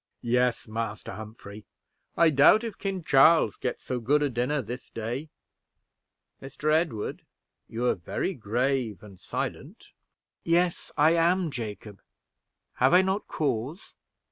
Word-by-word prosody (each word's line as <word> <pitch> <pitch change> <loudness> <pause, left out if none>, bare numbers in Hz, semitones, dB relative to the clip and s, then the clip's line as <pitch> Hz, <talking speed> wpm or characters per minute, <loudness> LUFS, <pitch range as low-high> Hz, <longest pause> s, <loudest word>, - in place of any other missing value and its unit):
"Yes, 125 0 +1
Master 110 -1 -4
Humphrey. 105 0 -10 0.5
I 165 -1 +5
doubt 150 - +6
if 225 -3 -6
King 195 -3 -3
Charles 155 +3 +5
eats 125 - -3
so 125 - -3
good 145 +6 +2
a 145 - 0
dinner 125 +4 -1
this 125 +4 -8
day. 120 +7 -5 1.1
Mr. 150 +3 -2
Edward, 155 -10 -1 0.5
you 115 +2 -3
are - - +3
very 95 - -3
grave 120 - -1
and 100 -3 -13
silent." - - -6 0.5
"Yes, 170 +1 +1
I 155 +2 +5
am, 170 0 +2
Jacob. 105 -4 -7 0.8
Have 130 +6 +4
I 185 - +6
not 190 +2 -1
cause? 140 - -3
130 Hz, 130 wpm, -27 LUFS, 115-160 Hz, 1.1 s, doubt